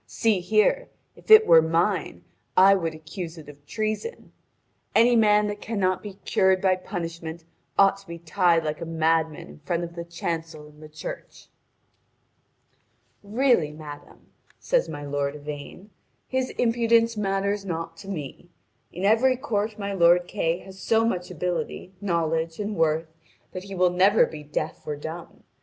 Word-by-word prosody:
See 220 -4 +1
here: 215 - +2 0.3
if - - -19
it 435 0 +9
were 165 - +7
mine, 165 - 0 0.3
I 195 +1 +8
would 165 -5 -1
accuse 165 +2 -7
it 155 - -11
of 145 -1 -14
treason. 215 - -4 0.6
Any 240 +1 +5
man 210 -2 +4
that 205 0 -4
cannot 190 -5 -1
be 205 -2 -8
cured 190 0 +3
by 185 0 +3
punishment 165 -3 -6 0.3
ought 195 0 +5
to 195 -1 -18
be 170 0 -7
tied 170 0 +2
like 155 +1 -3
a - - -3
madman 160 -1 0
in 75 0 -14
front 170 - -2
of 170 0 -6
the 170 0 -6
chancel 165 -2 -5
in 150 0 -18
the 155 0 -12
church." 155 0 -9 1.7
"Really, 210 - +2
madame," 150 -1 -12 0.3
says - - 0
my 145 - -6
lord 140 0 -2
Yvain, 150 +7 -9 0.4
"his 260 0 -1
impudence 230 -1 +3
matters 200 0 -1
not 165 -3 -5
to 195 - -12
me. 175 -2 -7 0.4
In 185 +3 -4
every 245 +5 +4
court 220 -5 -2
my 200 -1 -4
lord 175 -1 +4
Kay 165 +1 -1
has 190 0 -13
so 225 +3 +2
much 180 -5 -2
ability, 180 +2 -4
knowledge, 165 -3 -1
and 210 0 -3
worth 160 -1 0 0.4
that 185 +1 -7
he 195 -1 -7
will 180 -1 +3
never 190 +4 +4
be 155 - -9
deaf 150 +1 -4
or 150 - -2
dumb. 160 +4 -9
180 Hz, 160 wpm, -25 LUFS, 160-205 Hz, 1.7 s, it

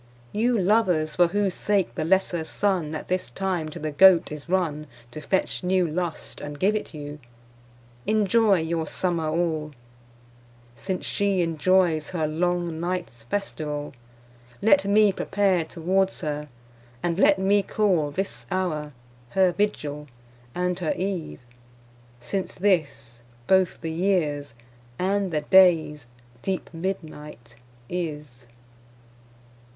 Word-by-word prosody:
You 235 +3 +1
lovers, 180 -6 +2
for 175 -1 +5
whose 200 +1 0
sake, 200 -2 0
the - - -2
lesser 175 -1 +1
Sunne 170 -3 -1
At 155 - -6
this 185 0 -2
time 185 -5 -2
to - - -9
the 155 0 -3
Goat 185 +2 +6
is 150 +2 -8
runne 160 -5 0 0.2
To 155 - -8
fetch 190 +3 -1
new 180 -1 +2
lust, 170 +1 -4
and 145 0 -6
give 205 +3 +2
it 215 - -4
you, 150 -1 -8 0.9
Enjoy 215 -1 +3
your 160 0 -2
summer 170 -3 -1
all; 155 -2 -1 1.0
Since 185 - -4
shee 200 -3 +1
enjoyes 165 -1 +2
her 165 -4 -1
long 170 +1 -1
nights 170 -10 -4
festivall, 150 -7 -3 0.7
Let 195 -2 +4
mee 205 +1 +5
prepare 195 -2 +1
towards 190 +4 0
her, 150 -2 -4 0.5
and 175 +1 -1
let 200 -1 +5
mee 195 +2 +3
call 185 -7 +1
This 145 -8 -4
houre 155 -6 -2 0.4
her 190 +5 +3
Vigill, 150 -8 -2 0.5
and 180 0 -1
her 170 -4 0
Eve, 185 -7 -4 0.8
since 185 +11 -4
this 145 - 0 0.2
Bothe 190 +3 +3
the 165 -1 -3
yeares, 160 -7 0 0.4
and 195 +3 0
the 155 -2 0
dayes 160 -5 +4 0.3
deep 190 -1 -3
midnight 155 -9 -6 0.3
is. 150 -8 -5
175 Hz, 125 wpm, -25 LUFS, 155-190 Hz, 1.0 s, Goat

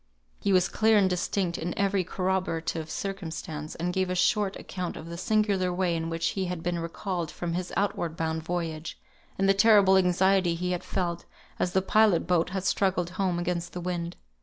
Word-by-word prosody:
He 200 - 0
was 185 -1 +4
clear 220 0 +3
and 195 -2 +5
distinct 180 0 -1
in 170 +1 -4
every 200 -1 +2
corroborative 180 -3 -2
circumstance, 160 -5 -5
and 175 +2 -2
gave 190 -1 0
a 185 - -1
short 205 +1 +2
account 180 -2 -5
of 160 - -8
the 170 - -6
singular 195 -1 +1
way 175 -1 0
in 165 0 -2
which 165 0 0
he 190 -1 -2
had 180 -2 -4
been 175 -1 -1
recalled 170 0 -3
from 170 -1 -4
his 180 +1 -3
outward 170 -5 -1
bound 160 0 -1
voyage, 165 -1 -4 0.4
and 195 - +2
the 195 - +6
terrible 200 -2 +6
anxiety 185 -1 +3
he 180 +2 -2
had 180 0 -2
felt, 175 -2 -2 0.3
as 180 - 0
the 190 - +2
pilot 210 -4 +4
boat 180 -1 +2
had 190 0 -3
struggled 190 -3 +1
home 185 -2 0
against 175 0 -2
the 180 - -4
wind. 175 -1 -3
180 Hz, 190 wpm, -27 LUFS, 170-190 Hz, 0.4 s, the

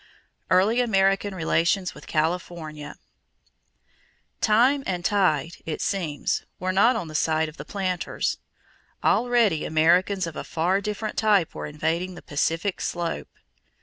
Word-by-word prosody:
Early 200 +7 +4
American 195 -3 +2
Relations 180 +2 +1
with - - -14
California. 160 -2 -3 1.5
Time 245 +6 +4
and 180 -2 -2
tide, 170 -6 +1
it 155 - -3
seems, 165 -7 -1 0.2
were 185 +1 -1
not 215 +6 +4
on 200 -7 -3
the 155 - -9
side 160 +1 +1
of 155 - -11
the - - -8
planters. 185 -3 -2 0.7
Already 235 -9 +3
Americans 175 +5 +3
of 165 -2 -7
a - - -4
far 180 +5 0
different 210 +1 -4
type 205 -6 +3
were - - -5
invading 165 +5 -2
the - - -11
Pacific 165 +6 -1
slope. 170 - -3
180 Hz, 130 wpm, -25 LUFS, 160-200 Hz, 1.5 s, Early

